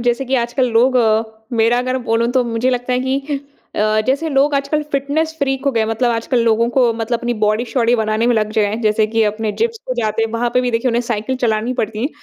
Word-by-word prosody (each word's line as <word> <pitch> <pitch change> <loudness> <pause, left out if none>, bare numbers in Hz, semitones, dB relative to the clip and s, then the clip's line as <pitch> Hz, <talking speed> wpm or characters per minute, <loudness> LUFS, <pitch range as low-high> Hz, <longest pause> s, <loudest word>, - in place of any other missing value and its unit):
जैसे 245 +2 +1
कि 265 +1 -1
आजकल 245 +1 0
लोग 250 +3 +3 0.6
मेरा 230 +2 +3
अगर 255 +1 -1
बोलूँ 230 +1 +2
तो 255 -1 +2
मुझे 235 +2 0
लगता 250 0 -2
है 250 - +1
कि 275 +2 -2 0.4
अ, 215 +1 +2
जैसे 280 +5 0
लोग 285 0 +2
आजकल 280 +2 0
फिटनेस 290 +4 -1
फ्रीक 270 -2 -1
हो 280 - +3
गए 230 - +1
हैं, 220 - +1
मतलब 225 +2 0
आजकल 230 +2 0
लोगों 230 +1 +2
को 245 -3 +4
मतलब 230 +1 -2
अपनी 240 0 -2
बॉडी-शॉडी 230 +3 +1
बनाने 220 +1 0
में 245 - +3
लग 215 -1 0
जाए, 210 -1 +1
जैसे 215 0 +2
कि 225 +1 +1
अपने 215 0 -1
जिम्स 460 0 +1
पे 255 - -1
जाते 220 0 0
हैं, 225 - -1
वहाँ 240 +1 0
पे 250 - +4
भी 250 - -1
देखिए 230 +2 0
उन्हें 235 +1 +1
साइकिल 235 +2 -2
चलानी 225 +1 +1
पड़ती 215 0 -3
है। 275 - +1
240 Hz, 235 wpm, -18 LUFS, 225-260 Hz, 0.6 s, को